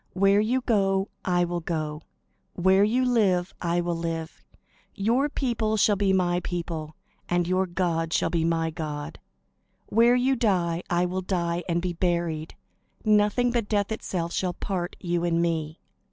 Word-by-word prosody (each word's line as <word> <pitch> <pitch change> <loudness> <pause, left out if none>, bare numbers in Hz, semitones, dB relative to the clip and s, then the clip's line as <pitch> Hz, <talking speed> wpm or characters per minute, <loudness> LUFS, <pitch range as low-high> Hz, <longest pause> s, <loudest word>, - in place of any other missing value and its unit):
Where 195 +2 +4
you 240 +5 +1
go, 195 -4 +1
I 175 -1 +2
will 175 0 -2
go; 155 -2 -3 0.5
where 190 +2 +4
you 245 +5 +2
live, 195 -7 +2
I 175 0 +1
will 175 0 -1
live; 165 -1 -4 0.5
your 235 +8 +1
people 230 -6 -1
shall 210 0 +4
be 195 -1 +1
my 180 -2 +2
people; 165 -3 -5 0.3
and 175 -1 +1
your 185 +1 +1
God 170 -2 -1
shall - - +1
be 165 -1 +1
my 165 0 0
God. 150 -1 -5 0.7
Where 235 +3 +5
you 260 +2 +2
die, 180 -7 +1
I 175 0 +2
will 185 +1 -2
die, 175 -2 -1
and 170 +1 0
be 180 -1 -1
buried. 170 -3 -1 0.5
Nothing 215 +3 +3
but 235 -3 -1
death 205 -1 0
itself 175 -5 -3
shall 180 -2 -1
part 180 -2 -3
you 175 -2 -1
and 170 -1 +1
me." 160 -2 -1
180 Hz, 160 wpm, -26 LUFS, 170-205 Hz, 0.7 s, Where